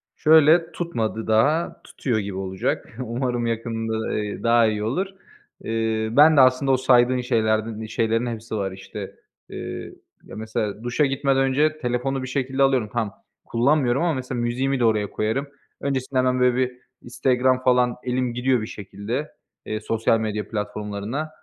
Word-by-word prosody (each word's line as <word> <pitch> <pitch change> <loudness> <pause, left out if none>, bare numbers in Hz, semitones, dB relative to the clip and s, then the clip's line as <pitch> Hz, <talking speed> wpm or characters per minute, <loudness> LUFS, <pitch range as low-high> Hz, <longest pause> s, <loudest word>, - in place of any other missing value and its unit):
Şöyle: 160 +2 +5
Tutmadı 115 -10 -3
daha, 145 +10 +2
tutuyor 120 -5 -2
gibi 100 -2 -5
olacak. 95 +3 -3
Umarım 120 0 -2
yakında, 115 -1 -2
eee, 105 -1 -3
daha 115 -1 +4
iyi 105 -1 -1
olur. 140 - -1 0.6
Eee, 110 -1 -1
ben 150 +4 +6
de - - +9
aslında 130 +1 +4
o 130 - +4
saydığın 125 -1 +4
şeylerden 110 -2 0
iii, 110 -1 -6
şeylerin 115 +1 0
hepsi 115 -1 -5
var 100 -2 -2
işte. 95 +1 -8 0.3
Eee, - - -6 0.3
ya - - -11
mesela 110 -1 -3
duşa 120 +5 +1
gitmeden 135 0 +1
önce 150 +4 +2
telefonu 130 +1 -2
bir 130 - -5
şekilde 135 +1 0
alıyorum. 130 -5 +2
Tamam, 115 -4 -1 0.3
kullanmıyorum 130 +1 +2
ama 170 -2 +2
mesela 125 -2 -3
müziğimi 130 +3 0
de 120 - +3
oraya 105 -2 +1
koyarım. 110 +7 -2 0.3
Öncesinde 135 -1 -2
hemen, 130 0 +2
böyle, 125 -1 +3
bir 130 -1 +1 0.3
Instagram 130 +1 +1
falan 125 -1 +3
elim 125 -1 -1
gidiyor 125 0 +1
bir 110 - -5
şekilde, 110 +9 -5 0.3
eee, 110 - -3
sosyal 115 +1 +1
medya 105 -1 -3
platformlarına, 105 +6 -4
120 Hz, 155 wpm, -23 LUFS, 110-130 Hz, 0.6 s, de